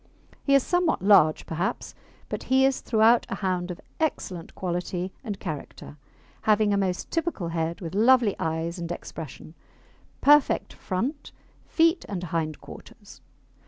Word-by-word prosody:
He 275 - +4
is 275 - +4
somewhat 355 - +1
large, 185 -7 +5
perhaps, 180 +9 -3 0.3
but - - -4
he 265 +1 +5
is 270 0 +1
throughout 225 +1 +4
a - - -2
hound 185 -2 -2
of 180 - -6 0.2
excellent 185 - -3
quality 180 0 -3
and 205 -5 -5
character, 150 0 -7 0.4
having 215 -1 +3
a - - +2
most 185 -2 -2
typical 330 - -2
head, 165 +1 -2
with 170 -1 -6
lovely 230 0 +4
eyes 165 +2 -2
and 170 0 -4
expression, 160 -2 -8 0.7
perfect 295 0 +4
front, 245 - -4 0.4
feet 330 +1 +3
and 185 -3 -4
hind 155 -2 -1
quarters. - - -13
195 Hz, 140 wpm, -26 LUFS, 170-255 Hz, 0.7 s, large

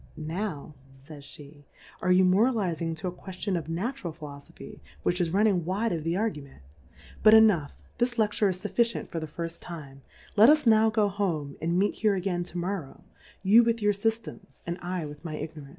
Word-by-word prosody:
Now, 160 -1 -4 0.3
faysfhe^ 145 -1 -12 0.4
are 185 - +1
you 185 +1 +5
moralizing 185 -5 +1
to 160 +3 -5
a - - -2
Qiieilion 185 +2 -5
of 165 -2 -4
Na 180 +10 -1
tural'Poilofopby 155 - -10 0.2
which 180 +1 +1
is 170 - +1
running 195 -1 +2
wide 200 +7 -1
of 165 -3 -2
the 165 +2 -1
Argument: 150 - -4 0.6
But 215 +1 +8
enough, 205 -10 +4 0.3
this 240 0 0
Le 220 -2 +4
ftureisfufficient 210 +3 0
for 165 - -4
the 155 - -5
firilTime, 165 -3 -8 0.4
let 220 +4 +8
us 300 -1 +4
now 220 -1 +5
go 215 -1 +2
home, 175 -8 -2
and 170 +2 0
meet 200 +2 +2
here 210 -2 +3
again 180 -1 -1
to 180 - -8
Morrov/, 175 -4 -4 0.4
You 215 +5 +7
with 230 0 +1
your 210 -1 +2
Sjftems, 220 -1 -4
and 170 +1 -4
I 180 -2 -3
with 145 +1 -10
my 160 -3 -5
Ignorance.. 150 -2 -7
180 Hz, 175 wpm, -27 LUFS, 160-210 Hz, 0.6 s, But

